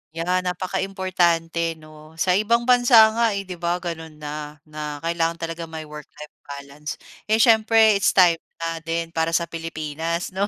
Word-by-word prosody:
Yeah, 180 +2 0
napakaimportante 180 -3 -1
'no, 155 0 -16
sa 180 +3 +1
ibang 215 +5 +2
bansa 240 -3 +6
nga, 230 -2 +1
eh, 200 - -3
'di 180 -2 -9
ba 170 0 0
gano'n 165 -3 -6
na 150 0 -7
na 150 -1 -7
kailangan 165 0 0
talaga 165 0 -6
may 160 -1 -7
work-life 150 0 -11 0.2
balance, 140 +1 -7 0.3
eh, 215 - +3
siyempre 220 -2 +5
it's 190 - +2
time 175 -3 +5 0.2
na 165 0 -4
din 165 +1 -3
para 165 0 0
sa 170 - +2
Pilipinas 165 +1 -4
'no, 195 +2 -1
165 Hz, 160 wpm, -22 LUFS, 160-190 Hz, 0.3 s, bansa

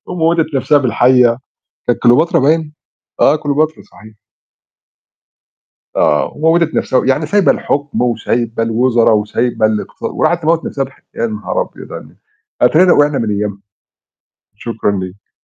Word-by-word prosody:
وموّتت 165 -2 0
نََفسها 145 +2 +2
بالحيّة. 125 -2 +3 0.5
كانت 120 - +1
كليوباترا 135 +8 +4
باين؟ 155 +2 +1 0.5
آه 150 - +5
كليوباترا 155 +1 -1
صحيح. 110 0 -17 1.8
آه. 75 - +1
وموِّتت 160 +1 +1
نَفسها 130 - +1
و - - -3
يعني 135 +4 +1
سايبة 200 +4 +3
الحكم 145 -2 -2
وسايبة 115 -1 -1
الوزرا، 115 +1 +2
وسايبة 110 +2 0
الاقتص 110 -1 -3
وراحت 175 0 0
تموِّت 165 +1 +1
نَفسها 135 - -2
بالح 135 - -13
يا 115 - -1
نهار 105 -1 -3
أبيض - - -9
على - - -6
الن - - -19 0.5
أتارينا 170 +9 +5
وقعنا 145 -1 +2
من 110 -2 -2
أيامها، 100 -1 -3 1.0
شكرًا 110 -2 -3
ليك. 95 0 -7
130 Hz, 135 wpm, -15 LUFS, 115-155 Hz, 1.8 s, آه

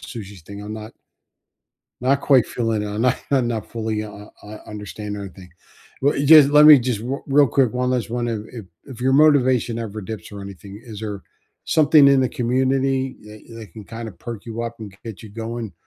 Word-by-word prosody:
sushi 100 -7 -10
thing, 100 +4 -10
I'm 105 +1 -7
not 110 +1 -9 1.1
not 135 +3 +1
quite 135 -4 +4
feeling 115 -3 -2
it, - - -4
I'm 105 +3 -3
not 125 0 +2
I'm 130 -4 +2
not 115 -2 -4
fully 110 -1 -3
u 105 0 -4
u 105 0 -12 0.2
u 110 - -9
understand 105 0 -7
everything. 95 -2 -10 0.5
Well, 145 - +2
e 140 - -1
just 150 -2 +8
let 150 +1 +7
me 150 -3 +10
just 120 -3 -2
r 135 +3 -4
real 140 0 +4
quick, 125 -1 +1
one 125 0 -1
last 120 -4 -2
one 120 0 -2
if 110 -2 -2
if 115 -4 -8 0.2
if 130 -4 -11
your 130 +1 +1
motivation 130 -5 +3
ever 110 -2 -5
dips 105 -1 -8
or 100 - -8
anything, 100 +1 -10
is 110 -4 -9
there 105 -3 -6 0.4
something 150 -2 +5
in 140 -1 +4
the 130 - +1
community 130 +2 0
that 105 0 -13
that 110 -3 -11
can 110 -3 -11
kinda 115 0 -7
perk 110 +4 -9
you 115 0 -5
up 115 0 -5
and 105 - -8
g 95 - -21
get 110 -4 -8
you 110 - -10
going? 115 -1 -6
115 Hz, 215 wpm, -21 LUFS, 105-130 Hz, 1.1 s, me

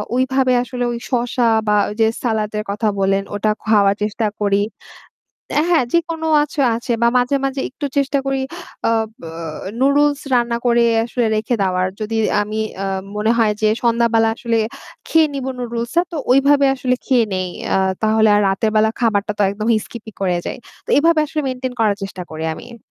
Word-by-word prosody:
ঐভাবে 260 0 +2
আসলে 250 0 -4
ওই 235 - -3
শশা 245 -1 0 0.2
বা 210 - +3
ওইযে 220 +2 +1 0.2
সালাদের 215 -3 -1
কথা 215 +2 -1
বলেন 195 0 +1
ওটা 215 +1 +1
খাওয়ার 205 -2 +4
চেষ্টা 215 +1 -1
করি। 200 -1 +2 0.9
অ্যা 300 - +3
হ্যাঁ, 320 -7 +4
যেকোনো 330 -1 0 0.2
আছো 295 +1 -3 0.2
আছে, 235 +1 -3
বা 235 - +5
মাঝে, 250 +3 +1
মাঝে 270 0 -1
একটু 285 +3 -5
চেষ্টা 280 0 +1
করি 270 0 0 0.5
আ - - +3 0.3
ব - - -18 0.6
নুডলস 285 +1 +3
রান্না 240 -1 +2
করে 235 0 +4 0.2
আসলে 235 0 -1
রেখে 220 +3 -1
দেওয়ার। 185 -1 +1
যদি 215 +1 -3 0.3
আমি 215 +1 -4 0.3
আ - - -1 0.3
মনে 210 +1 +1
হয় 220 -2 +3
যে 215 - +4
সন্ধ্যাবেলা 230 -1 +3
আসলে 230 -2 -1 0.5
খেয়ে 320 -1 +4
নিবো 265 -1 -3
নুডলস 235 -1 -3
টা 345 - +5
তো - - -4 0.2
ওইভাবে 280 +1 +4
আসলে 255 -1 0
খেয়ে 250 -4 +3
নেই। 185 -1 -2 0.3
আ - - +4 0.3
তাহলে 220 0 +3
আর 205 - +4
রাতের 195 +3 0
বেলা 215 0 +4
খাবারটা 210 -3 +1
তো - - +3
একদম 210 +2 -4 0.2
স্কিপ 235 -2 -10 0.2
করে 185 -2 +1
যাই। - - -4 0.3
তো - - -6
এভাবে 330 +1 +4
আসলে 305 +1 -3
মেইনটেইন 255 0 -4
করার 210 -3 +2
চেষ্টা 195 -2 -6
করি 160 0 -5
আমি। 235 - -11
235 Hz, 180 wpm, -19 LUFS, 215-265 Hz, 0.9 s, বা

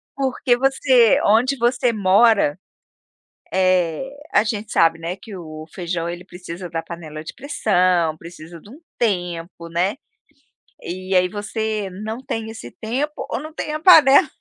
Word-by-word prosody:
Porque 260 -2 +1
você 260 -3 +4
onde 250 +6 +3
você 245 0 +1
mora 200 -4 +3 0.9
eh, 185 +2 +1 0.2
a - - +4
gente 215 -1 -4
sabe, 165 0 +3
né, 170 +2 -4
que 200 +2 -11
o 155 -3 -9
feijão 170 -2 -3
ele 175 +1 -6
precisa 180 -1 -9
da 165 0 -4
panela 155 -3 -8
de - - -8
pressão, 185 - +1
precisa 170 0 -11
de 205 - -16
um 275 - -13 0.2
tempo, 175 -5 -2
né. 180 +5 0 0.9
E 185 +2 -4
aí, 180 0 +4
você 210 0 -3
não 220 +2 -4
tem 225 -4 -4
esse 225 - -9
tempo 265 +7 -2 0.2
ou - - -2
não 310 +2 -9
tem 300 - -4
a 305 - -2
panela 300 -6 +7
195 Hz, 150 wpm, -21 LUFS, 170-235 Hz, 0.9 s, panela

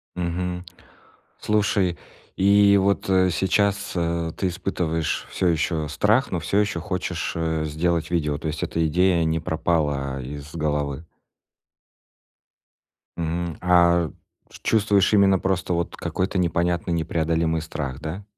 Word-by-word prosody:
Мгм. 90 +1 -3 0.7
Слушай, 100 -4 +1 0.4
и 100 +1 +5
вот, 100 0 +1
э, 95 -1 +4
сейчас, 100 +3 +1
э, 85 -1 -1
ты 95 - 0
испытываешь 85 -3 -2
всё 90 - 0
ещё 80 -1 0
страх, 105 - +2
но 90 - -1
всё 85 +5 0
ещё 100 -6 0
хочешь, 90 -1 -3
э, 80 -1 -1
сделать 80 +2 -1
видео, 75 -4 0
то 80 - -5
есть 75 +1 -3
эта 80 0 0
идея 90 +1 +2
не 80 +1 0
пропала 75 -5 -1
из 70 +4 -8
головы? 75 -1 -2 2.1
Мгм. 85 0 -3
А 85 -2 +4 0.4
ш - - -13
чувствуешь 105 -2 +3
именно 100 -2 +5
просто 95 -1 -1
вот 85 0 -2
какой-то 95 +1 -2
непонятный 85 0 0
непреодолимый 80 0 0
страх, 70 -4 -5
да? 80 +7 -5
85 Hz, 125 wpm, -23 LUFS, 80-95 Hz, 2.1 s, и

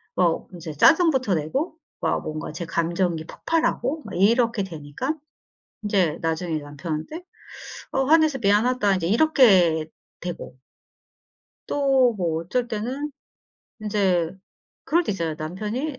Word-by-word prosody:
어 175 -3 +1
인제 165 -3 -7
짜증부터 265 - +4
내고 215 - -2 0.3
막 - - 0
뭔가 155 0 -5
제 165 +3 -5
감정이 170 0 -1
폭발하고 320 - -1
막 - - -7
이렇게 230 +3 +3
되니까 165 - -4 0.7
인제 185 -7 +1
나중에 165 -1 -1
남편한테 155 - -6 0.7
"어 270 - +1
화내서 310 -1 +4
미안하다." 210 -1 +2
이제 170 -3 -2
이렇게 195 - +4 0.3
되고. 175 -7 -6 1.1
또 270 -4 +3
뭐 165 -4 -1
어쩔 240 +8 -1
때는 250 +7 -3 0.7
인제 190 -6 +1 0.5
그럴 345 +2 +2
때 210 - -1
있어요. 165 -4 -2
남편이 215 - -4
200 Hz, 255 characters per minute, -24 LUFS, 165-260 Hz, 1.1 s, 짜증부터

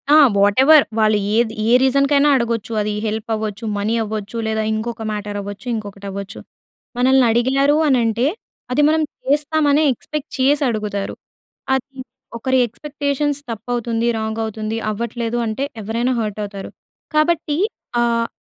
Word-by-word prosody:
ఆ! - - +8 0.2
వాటెవర్ 265 +10 +6 0.2
వాళ్ళు 215 -1 +4 0.2
ఏది 225 -1 +2 0.2
ఏ - - +3
రీసన్‍కైనా 280 +2 +3
అడగొచ్చు. 230 -3 -1
అది 210 0 -1
హెల్ప్ 215 +1 -4
అవ్వచ్చు 215 0 -4
మనీ 205 +2 -1
అవ్వచ్చు. 215 +1 -5
లేదా 220 0 0
ఇంకొక 225 +1 -4
మ్యాటర్ 210 -1 -4
అవ్వచ్చు. 205 +3 -8
ఇంకొకటి 200 -2 -7
అవ్వచ్చు. 200 0 -7 0.6
మనల్ని 260 +1 +4
అడిగారు 270 +5 +3
అనంటే 235 -2 +2 0.5
అది 295 - +3
మనం 315 +1 +2 0.3
చేస్తామనే 295 +1 +2
ఎక్స్‌పెక్ట్ 300 +4 -6
చేసి 280 +3 +3
అడుగుతారు. 210 -3 -3 0.6
అది 265 +1 -2 0.4
ఒకరి 260 +2 +1
ఎక్స్‌పెక్టేషన్స్ 285 +3 -2
తప్పు 225 +2 -8
అవుతుంది. 235 -1 -1
రాంగ్ 220 0 -3
అవుతుంది. 220 0 -3
అవ్వట్లేదు 235 +2 -3
అంటే 220 +5 -2 0.2
ఎవ్వరైనా 230 +4 -1
హర్ట్ 215 -1 -4
అవుతారు. 200 -1 -8 0.5
కాబట్టి 305 -1 +2 0.4
ఆహ్, 230 -1 +1
235 Hz, 135 wpm, -19 LUFS, 215-275 Hz, 0.6 s, ఆ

